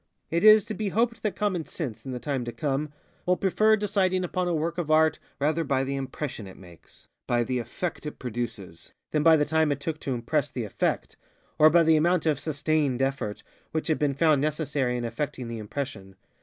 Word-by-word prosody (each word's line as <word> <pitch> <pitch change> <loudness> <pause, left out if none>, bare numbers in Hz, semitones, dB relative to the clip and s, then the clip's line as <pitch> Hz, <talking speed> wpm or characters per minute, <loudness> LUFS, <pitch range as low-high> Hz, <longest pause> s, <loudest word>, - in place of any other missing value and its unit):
It 170 +3 +1
is 215 -1 +8
to - - -4
be 215 -1 -2
hoped 230 +3 0
that 215 - -1
common 190 -6 -1
sense, 135 -11 -5
in 135 - -6
the 125 - -3
time 135 0 -2
to 120 - -4
come, 145 +4 -2 0.4
will 180 0 +3
prefer 215 +4 +3
deciding 190 -3 +1
upon 180 0 -1
a 175 - 0
work 165 +2 -2
of 165 -3 -3
Art 155 0 +4 0.2
rather 155 +3 +1
by 135 -3 +1
the 135 +1 -2
impression 135 -4 -5
it 95 - -12
makesŌĆöby 95 +6 -5
the 125 0 -1
effect 160 +6 -4
it 150 - -7
producesŌĆöthan 120 - -5
by 160 0 +7
the 150 - +2
time 160 0 +2
it 140 - -1
took 155 +2 -4
to 135 -4 -2
impress 120 -1 -1
the - - -4
effect, - - -2 0.4
or 155 0 +8
by 170 +2 +5
the 160 -1 +5
amount 170 +2 +2
of 150 -4 +2
ŌĆ£sustained 150 -3 0
effortŌĆØ 135 -5 -2 0.3
which 160 +1 -1
had 155 - +1
been 145 -2 +1
found 155 -2 +3
necessary 145 -4 -1
in 120 - -3
effecting 125 +1 -4
the 115 -1 -5
impression. 105 -4 -6
150 Hz, 205 wpm, -27 LUFS, 130-165 Hz, 0.4 s, is